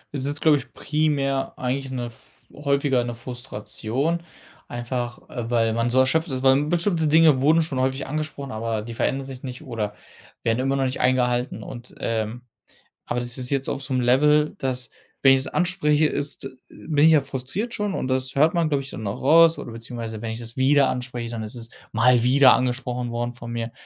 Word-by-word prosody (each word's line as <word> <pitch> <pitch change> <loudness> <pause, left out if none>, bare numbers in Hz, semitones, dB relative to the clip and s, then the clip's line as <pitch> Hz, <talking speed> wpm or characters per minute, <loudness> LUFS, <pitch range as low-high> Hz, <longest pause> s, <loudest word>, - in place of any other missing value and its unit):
Das 135 - -3
ist, 145 +1 -4
glaube 155 -2 +5
ich 135 - -9
primär 140 -3 0
eigentlich 130 +1 -2
'ne 125 -2 -3
f 115 -1 -15
häufiger 140 -3 +1
'ne 120 -1 -4
Frustration. 125 +5 -3 0.5
Einfach, 120 0 -4
äh, 120 -2 -5
weil 115 -2 +2
man 115 +1 0
so 125 - 0
erschöpft 160 +6 +3
ist, 130 0 -3
weil 135 +2 +4
bestimmte 170 0 +1
Dinge 155 -3 +5
wurden 160 +4 +4
schon 140 -5 -3
häufig 130 +1 0
angesprochen, 145 -2 -4
aber 110 -1 -2
die 115 +1 -7
verändern 135 +4 -1
sich 130 -1 -9
nicht 125 +1 -7
oder 110 -6 -4 0.5
werden 115 +2 +1
immer 135 +1 +1
noch 135 - +1
nicht 130 0 -2
eingehalten 125 -1 +1
und, 120 +1 -10
ähm 115 +2 -2 0.6
aber 125 - -2
das 120 +1 -2
ist 125 -1 -1
jetzt 135 -1 0
auf 135 - -3
so 135 0 -5
'nem 125 -1 +1
Level, 150 +5 +4
dass, 130 -1 -2 0.3
wenn 135 - +8
ich 130 - +2
das - - -4
anspreche, 160 -4 +2
ist 145 -1 -4
äh, 135 - -5 0.2
bin 150 -2 0
ich - - +7
ja 155 -3 +5
frustriert 140 - -4
schon 205 -2 -2
und - - -2
das 130 +1 -1
hört 155 +4 +4
man, 170 -2 +2
glaube 140 -2 0
ich 140 - -8
dann 110 - -7
auch 100 - -5
raus, 165 +3 +6
oder 120 - -7
beziehungsweise 115 -1 -7
wenn 115 - -3
ich 110 - -4
das 115 0 -9
wieder 135 +1 +4
anspreche, 125 -2 -4
dann 115 -2 -4
ist 110 +3 -5
es 115 -1 -7 0.2
mal 120 +1 +4
wieder 130 +1 +6
angesprochen 125 -1 -1
worden 120 +1 -3
von 120 -1 -9
mir 115 0 -4
130 Hz, 210 wpm, -24 LUFS, 120-145 Hz, 0.6 s, wenn